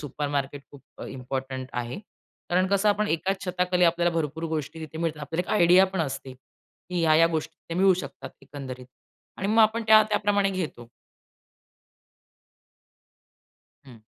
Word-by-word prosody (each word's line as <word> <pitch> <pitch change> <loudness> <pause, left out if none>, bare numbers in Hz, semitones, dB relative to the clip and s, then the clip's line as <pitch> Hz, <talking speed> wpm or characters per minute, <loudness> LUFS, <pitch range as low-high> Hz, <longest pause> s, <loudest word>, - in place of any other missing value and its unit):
Supermarket 145 -1 -3
खूप 140 -2 -15 0.2
अ, - - -7
important 130 0 -5
आहे. 125 +9 -4 0.5
कारण 185 +2 +3
कसं 200 +1 +2
आपण 210 +1 +1
एकाच 190 +4 -1
छताखाली 180 0 +1
आपल्याला 170 0 +2
भरपूर 160 0 -2
गोष्टी 155 +2 -4
तिथे 160 0 -8
मिळतात. 160 -3 -2
आपल्याला 165 +5 -3
एक - - +2
आयडिया 180 +3 +7
पण 190 - -1
असते 135 -3 -4
की 170 +6 -9
ह्या-ह्या 160 +1 +5
गोष्टी 160 -1 -3
तिथे 165 - -9
मिळू 190 -1 +5
शकतात 140 -6 -7
एकंदरीत. 130 -3 -8 0.5
आणि 195 - -3
मग 220 +1 +5
आपण 220 +2 +2
त्या-त्या 215 -1 +6
प्रमाणे 200 -1 +1
घेतो. 155 -11 -5 3.0
हं. 120 -4 -14
165 Hz, 145 wpm, -26 LUFS, 140-190 Hz, 3.0 s, आयडिया